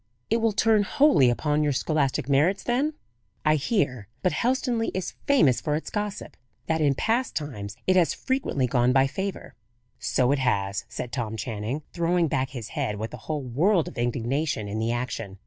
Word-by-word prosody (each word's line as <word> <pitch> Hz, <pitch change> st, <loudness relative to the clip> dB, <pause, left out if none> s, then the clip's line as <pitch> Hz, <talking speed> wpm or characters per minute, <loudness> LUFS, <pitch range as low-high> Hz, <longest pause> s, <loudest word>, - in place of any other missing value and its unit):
"It 225 Hz, -, +4 dB
will 225 Hz, -1 st, +2 dB
turn 215 Hz, +1 st, +3 dB
wholly 210 Hz, -, +4 dB
upon 150 Hz, +5 st, +1 dB
your 145 Hz, -1 st, +2 dB
scholastic 140 Hz, -1 st, 0 dB
merits, 155 Hz, +8 st, +2 dB
then? 275 Hz, +6 st, 0 dB, 0.5 s
I 155 Hz, -, +5 dB
hear 140 Hz, -, 0 dB, 0.2 s
but 180 Hz, -, +3 dB
Helstonleigh 245 Hz, -2 st, 0 dB
is 185 Hz, -, -3 dB
famous 195 Hz, -, +4 dB
for 150 Hz, -2 st, 0 dB
its 155 Hz, -, -4 dB
gossip 210 Hz, -1 st, -4 dB, 0.3 s
that 160 Hz, 0 st, 0 dB
in 140 Hz, -2 st, +3 dB
past 235 Hz, -, 0 dB
times 105 Hz, -9 st, -5 dB
it 185 Hz, -, +3 dB
has 175 Hz, -3 st, +3 dB
frequently 260 Hz, -, -1 dB
gone 125 Hz, 0 st, +2 dB
by 135 Hz, 0 st, +5 dB
favour." 190 Hz, +8 st, -4 dB, 0.5 s
"So 125 Hz, 0 st, +1 dB
it 140 Hz, -, +2 dB
has," 100 Hz, -6 st, 0 dB
said 125 Hz, -, -5 dB
Tom 110 Hz, -3 st, -3 dB
Channing, 115 Hz, +6 st, -4 dB
throwing 170 Hz, 0 st, +2 dB
back 135 Hz, -2 st, -1 dB
his 120 Hz, -5 st, -7 dB
head 105 Hz, -, -2 dB
with 110 Hz, +2 st, -5 dB
a -, -, -5 dB
whole 150 Hz, -3 st, -1 dB
world 160 Hz, -, +2 dB
of -, -, -9 dB
indignation 120 Hz, 0 st, -1 dB
in 105 Hz, +2 st, -3 dB
the 115 Hz, +1 st, 0 dB
action. 115 Hz, -5 st, -4 dB
145 Hz, 180 wpm, -26 LUFS, 120-190 Hz, 0.5 s, I